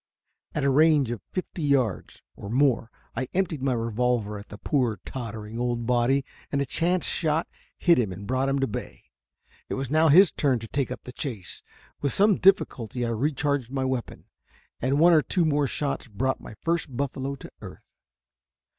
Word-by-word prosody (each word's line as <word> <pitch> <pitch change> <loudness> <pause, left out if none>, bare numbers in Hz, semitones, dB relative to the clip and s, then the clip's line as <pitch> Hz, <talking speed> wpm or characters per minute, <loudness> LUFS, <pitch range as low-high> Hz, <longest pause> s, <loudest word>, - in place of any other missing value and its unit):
At 150 - 0
a 140 - +3
range 150 -3 +4
of 120 -5 -4
fifty 185 -2 -4
yards, 135 -8 0
or 100 - -8
more, 125 -1 +2 0.3
I 130 - -2
emptied 180 -7 0
my 135 -1 +1
revolver 115 -2 0
at 100 - -13
the 105 - -9
poor, 120 - 0
tottering, 115 -3 -6
old 120 -1 -1
body, 125 +3 +2 0.3
and 140 - 0
a 140 - +1
chance 170 +6 +1
shot 160 0 0 0.3
hit 170 -6 +4
him 110 -6 0
and 95 +3 -8
brought 130 +4 0
him 135 - +1
to 135 - +2
bay. 110 - -6 0.7
It - - -2
was 135 -1 -4
now 160 +1 +4
his 175 +5 +7
turn 135 -4 +1
to 115 0 -7
take 135 +3 -1
up - - -6
the 125 - -9
chase. 115 - -6 0.4
With 140 -3 0
some 205 -1 +4
difficulty 125 - +2
I - - -1
recharged 140 +1 0
my 135 -1 -1
weapon, 130 -2 -3 0.6
and 130 +3 +1
one 170 +3 +6
or 155 - +6
two 175 +2 0
more 145 -2 +2
shots 140 -1 -3
brought 130 +5 -1
my 110 - -10
first 165 -6 -1
buffalo 140 0 -2
to - - -11
earth. - - -12
135 Hz, 185 wpm, -26 LUFS, 120-150 Hz, 0.7 s, his